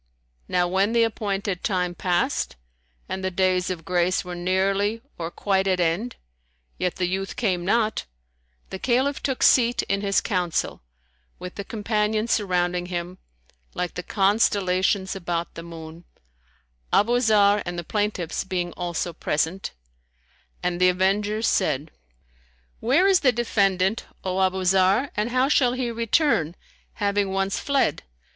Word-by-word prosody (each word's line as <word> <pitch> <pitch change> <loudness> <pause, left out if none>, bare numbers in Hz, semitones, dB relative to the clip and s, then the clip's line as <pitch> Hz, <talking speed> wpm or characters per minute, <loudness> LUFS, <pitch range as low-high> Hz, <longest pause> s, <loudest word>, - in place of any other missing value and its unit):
Now 180 0 +1
when 195 +5 +1
the 235 -1 +4
appointed 200 -4 -2
time 180 -2 0
passed 175 -1 -1 0.5
and 190 - -4
the 190 - 0
days 185 0 +1
of 170 -3 -5
grace 180 +1 +1
were 180 - -6
nearly 195 +4 0 0.2
or 165 -1 -3
quite 195 +1 0
at 185 -1 +1
end 180 +8 0 0.6
yet 180 -1 -1
the 185 - -1
youth 190 +2 -3
came 190 -8 0
not, 215 +3 +1 0.7
the 190 - -5
Caliph 260 +5 +1
took 265 -2 -1
seat 240 -1 +4
in 200 0 -1
his 200 -1 +2
council, 180 -4 -1 0.6
with 180 0 -8
the 200 - -6
Companions 215 +1 -1
surrounding 180 -3 0
him, 180 0 -5 0.6
like 180 -1 -2
the - - -4
constellations 195 -1 +1
about 170 -2 -3
the 165 - -7
moon, 165 0 -10 0.9
Abu 240 +4 +3
Zarr 210 -3 +4
and 175 0 -5
the 175 - -3
plaintiffs 205 -4 -2
being 180 -2 -2
also 175 -1 -3
present; 165 +4 -1 0.9
and 180 0 -1
the 185 - +6
avengers 205 +4 +1
said, 150 -3 0 0.9
"Where 275 +11 +3
is 390 -2 +5
the 260 - +4
defendant, 200 -4 +1 0.2
O 185 0 -1
Abu 190 0 +1
Zarr, 190 +8 +3
and 210 +3 0
how 255 +2 +2
shall 255 -4 +3
he 250 -2 -2
return, 230 - +1 0.4
having 200 -1 0
once 195 0 -1
fled? 275 - +1
190 Hz, 140 wpm, -24 LUFS, 180-215 Hz, 0.9 s, the